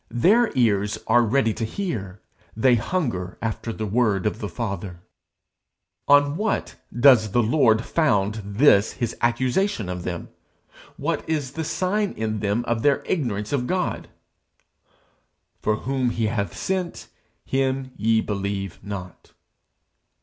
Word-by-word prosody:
Their 210 Hz, -, +3 dB
ears 105 Hz, -4 st, +2 dB
are 120 Hz, +2 st, +4 dB
ready 115 Hz, 0 st, +2 dB
to 115 Hz, -, -4 dB
hear; 110 Hz, -, -4 dB, 0.4 s
they 125 Hz, +3 st, +4 dB
hunger 115 Hz, -, -1 dB
after 115 Hz, +1 st, -3 dB
the 110 Hz, -1 st, -4 dB
word 105 Hz, -3 st, +1 dB
of 105 Hz, -, -1 dB
the 105 Hz, -, -3 dB
Father_.' 100 Hz, -5 st, -4 dB, 1.1 s
On 145 Hz, +1 st, +5 dB
what 215 Hz, +2 st, -1 dB, 0.2 s
does 120 Hz, -4 st, +5 dB
the 120 Hz, -, +3 dB
Lord 115 Hz, -2 st, +3 dB
found 110 Hz, -9 st, +1 dB
this 100 Hz, 0 st, +4 dB
his 120 Hz, -, -3 dB
accusation 120 Hz, -, 0 dB
of 90 Hz, -1 st, -4 dB
them? 85 Hz, -1 st, -5 dB, 0.7 s
What -, -, -2 dB
is 145 Hz, -5 st, -1 dB
the 160 Hz, +3 st, -4 dB
sign 195 Hz, +5 st, -1 dB
in 110 Hz, -1 st, -3 dB
them 105 Hz, +3 st, -1 dB
of 115 Hz, -1 st, -1 dB
their 140 Hz, +1 st, +2 dB
ignorance 110 Hz, -, -2 dB
of 125 Hz, -3 st, 0 dB
God? 185 Hz, -1 st, -2 dB, 1.5 s
For 110 Hz, -, +1 dB
whom 130 Hz, +2 st, -1 dB
he 115 Hz, -1 st, -1 dB
hath 105 Hz, -4 st, -2 dB
sent, 185 Hz, -2 st, -3 dB, 0.4 s
him 135 Hz, 0 st, -1 dB
ye 110 Hz, +1 st, +2 dB
believe 100 Hz, -2 st, -3 dB
not.' 95 Hz, -4 st, -8 dB
115 Hz, 135 wpm, -23 LUFS, 105-140 Hz, 1.5 s, On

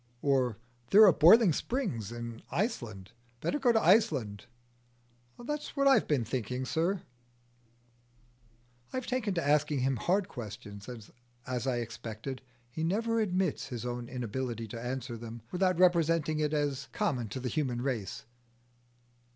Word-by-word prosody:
"Or, 130 Hz, -6 st, +2 dB, 0.3 s
there 215 Hz, +2 st, +9 dB
are 190 Hz, -, +7 dB
boiling 185 Hz, +4 st, +7 dB
springs 160 Hz, -, -2 dB
in 120 Hz, -1 st, -6 dB
Iceland. 120 Hz, -, -3 dB, 0.3 s
Better 295 Hz, -, -1 dB
go 255 Hz, -3 st, +4 dB
to 225 Hz, -, +4 dB
Iceland." 135 Hz, -, +2 dB, 0.9 s
"That's 295 Hz, +5 st, -5 dB
what 275 Hz, -1 st, +3 dB
I've 270 Hz, -, +5 dB
been 135 Hz, -6 st, +1 dB
thinking, 125 Hz, +2 st, -3 dB
sir." 170 Hz, +7 st, 0 dB, 1.9 s
I -, -, -3 dB
have 255 Hz, -, -3 dB
taken 235 Hz, -7 st, -1 dB
to 170 Hz, -4 st, -1 dB
asking 150 Hz, -1 st, +2 dB
him 130 Hz, 0 st, +1 dB
hard 185 Hz, -, +1 dB
questions, 105 Hz, -, -8 dB
and 115 Hz, -4 st, -9 dB, 0.4 s
as 125 Hz, 0 st, -3 dB
I 130 Hz, -, +1 dB
expected, 115 Hz, +2 st, -6 dB, 0.3 s
he 160 Hz, -, -4 dB
never 225 Hz, +7 st, +1 dB
admits 185 Hz, -9 st, 0 dB
his 120 Hz, -3 st, -5 dB
own 120 Hz, 0 st, -4 dB
inability 120 Hz, -2 st, -4 dB
to 115 Hz, +2 st, -6 dB
answer 125 Hz, -1 st, -4 dB
them 115 Hz, 0 st, -9 dB
without 185 Hz, -1 st, +1 dB
representing 165 Hz, -3 st, +3 dB
it 150 Hz, -1 st, +1 dB
as 145 Hz, -2 st, -1 dB
common 135 Hz, -, -1 dB
to 130 Hz, -, -5 dB
the 125 Hz, 0 st, -3 dB
human 125 Hz, -5 st, -1 dB
race. 120 Hz, -8 st, -3 dB
135 Hz, 145 wpm, -31 LUFS, 120-185 Hz, 1.9 s, there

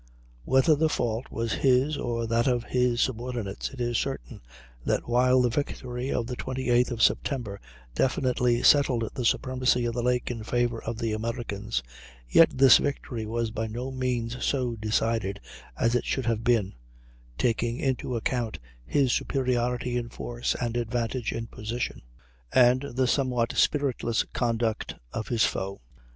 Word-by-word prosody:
Whether 135 Hz, +4 st, +4 dB
the 160 Hz, +2 st, +2 dB
fault 120 Hz, -3 st, -1 dB
was 115 Hz, -1 st, -2 dB
his 135 Hz, +3 st, +3 dB
or 115 Hz, -3 st, -2 dB
that 115 Hz, +2 st, +1 dB
of 120 Hz, -2 st, +1 dB
his 125 Hz, -1 st, +1 dB
subordinates, 120 Hz, -5 st, -2 dB
it 135 Hz, -, -12 dB
is 120 Hz, -2 st, 0 dB
certain -, -, -5 dB, 0.4 s
that -, -, -1 dB
while 125 Hz, +1 st, +4 dB
the 125 Hz, -, +3 dB
victory 125 Hz, -1 st, -3 dB
of 120 Hz, -, 0 dB
the 125 Hz, +1 st, -5 dB
28th 125 Hz, -1 st, +1 dB
of 115 Hz, -3 st, -1 dB
September 115 Hz, -8 st, 0 dB, 0.3 s
definitely 125 Hz, -, +1 dB
settled 130 Hz, -6 st, +4 dB
the 125 Hz, -, -3 dB
supremacy 125 Hz, 0 st, +1 dB
of 120 Hz, -, -1 dB
the 120 Hz, -, -1 dB
lake 125 Hz, 0 st, 0 dB
in 115 Hz, -2 st, -5 dB
favor 120 Hz, 0 st, 0 dB
of 115 Hz, 0 st, -4 dB
the 115 Hz, -1 st, -1 dB
Americans, 110 Hz, -, -3 dB, 0.4 s
yet 165 Hz, -, +6 dB
this 130 Hz, -1 st, +7 dB
victory 120 Hz, -5 st, -3 dB
was 115 Hz, 0 st, -2 dB
by 110 Hz, 0 st, -3 dB
no 120 Hz, +4 st, -5 dB
means 125 Hz, -2 st, -2 dB
so 125 Hz, -4 st, 0 dB
decided 110 Hz, -2 st, -1 dB, 0.4 s
as 115 Hz, -, +2 dB
it 125 Hz, -, +1 dB
should 130 Hz, -, -1 dB
have 115 Hz, -1 st, 0 dB
been, 115 Hz, -5 st, +2 dB, 0.6 s
taking 120 Hz, -, 0 dB
into 130 Hz, -2 st, -1 dB
account 115 Hz, 0 st, -2 dB, 0.3 s
his 130 Hz, -, +2 dB
superiority 125 Hz, -2 st, 0 dB
in 120 Hz, -1 st, -3 dB
force -, -, -3 dB
and 120 Hz, -1 st, -2 dB
advantage 120 Hz, 0 st, -2 dB
in 115 Hz, -, -4 dB
position, 115 Hz, +2 st, -4 dB, 0.5 s
and 125 Hz, 0 st, +5 dB
the 130 Hz, 0 st, +2 dB
somewhat 125 Hz, -3 st, +1 dB
spiritless 130 Hz, -5 st, +1 dB
conduct 115 Hz, -2 st, -1 dB, 0.2 s
of 110 Hz, -, -3 dB
his 115 Hz, -3 st, +3 dB
foe. 95 Hz, 0 st, -3 dB
120 Hz, 155 wpm, -27 LUFS, 115-125 Hz, 0.6 s, this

